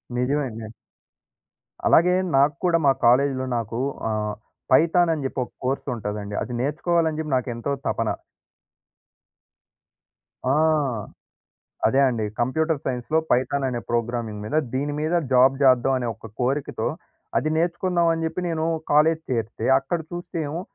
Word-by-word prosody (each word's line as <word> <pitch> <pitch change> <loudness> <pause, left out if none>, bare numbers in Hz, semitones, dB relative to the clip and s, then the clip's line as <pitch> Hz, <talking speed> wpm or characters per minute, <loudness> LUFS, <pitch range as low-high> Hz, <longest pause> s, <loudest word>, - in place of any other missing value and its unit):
నిజమే 140 +4 +1
అండి. 110 0 -8 1.2
అలాగే 180 +2 +5 0.2
నాకు 140 +1 +4
కూడా, 170 -2 +4
మా 135 - +6
కాలేజీలో 130 +2 +3
నాకు 115 +1 -3 0.3
ఆహ్, 105 -1 -1 0.4
పైథానని 165 +1 +4
జెప్పి 135 0 -2
ఒక - - -11
కోర్సుంటదండి. 105 -6 -3
అది 125 - -6
నేర్చుకోవాలని 160 +2 0
చెప్పి 155 -3 -3
నాకెంతో 120 +1 -3 0.2
తపన. - - 0 2.4
ఆ! 130 - +2 1.3
అదే 135 +5 +3
అండి. 115 -4 -1 0.2
కంప్యూటర్ 155 +5 0
సైన్స్‌లో 130 +5 -1
పైథాననే 130 0 +1
ప్రోగ్రామింగ్ 115 -3 -2
మీద, 110 +9 -2 0.2
దీని 145 +2 -1
మీద 155 +3 0 0.2
జాబ్ 130 +1 +6
చేద్దాం 130 0 +4
అనే 120 - -3
ఒక 110 0 -12
కోరికతో, 135 +3 -1 0.5
అది 155 - -1
నేర్చుకుందాం 170 +1 +1
అని 165 0 -2
జెప్పి 170 +3 -2
నేను 160 -1 -1 0.3
కాలేజీ 160 +2 +4
చేరితే, 115 -2 -2
అక్కడ 170 +5 -3
చూస్తే 175 0 -5
ఏమో 165 +4 -4
135 Hz, 125 wpm, -24 LUFS, 120-160 Hz, 2.4 s, మా